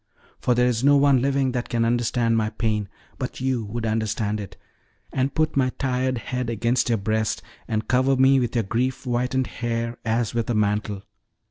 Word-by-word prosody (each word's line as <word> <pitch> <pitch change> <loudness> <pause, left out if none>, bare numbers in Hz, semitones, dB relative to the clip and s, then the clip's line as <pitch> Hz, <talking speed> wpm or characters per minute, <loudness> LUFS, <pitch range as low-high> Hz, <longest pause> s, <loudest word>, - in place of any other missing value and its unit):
For 125 - +2
there 125 +1 +3
is 125 -1 0
no 145 +1 +6
one 140 -3 +4
living 135 -1 +1
that 125 -1 -3
can 115 -1 +1
understand 120 0 +1
my 110 -1 +1
pain; 105 -3 -1 0.3
but 130 - -4
you 130 -3 0
would 115 +3 -4
understand 110 -1 -1
it, 100 -3 -8 0.6
and 135 +1 0
put 155 0 +1
my 130 -2 +3
tired 130 -1 0
head 125 +1 -3
against 120 +2 +1
your 115 - +3
breast, 110 +2 -1 0.2
and 110 0 -2
cover 130 +1 +3
me 135 +1 +5
with 120 -1 -2
your 115 - +2
grief 125 +6 -1
whitened 125 +1 0
hair 115 -1 -3
as 115 -1 0
with 115 0 -1
a 120 - +1
mantle. 105 -1 0
120 Hz, 190 wpm, -24 LUFS, 110-130 Hz, 0.6 s, no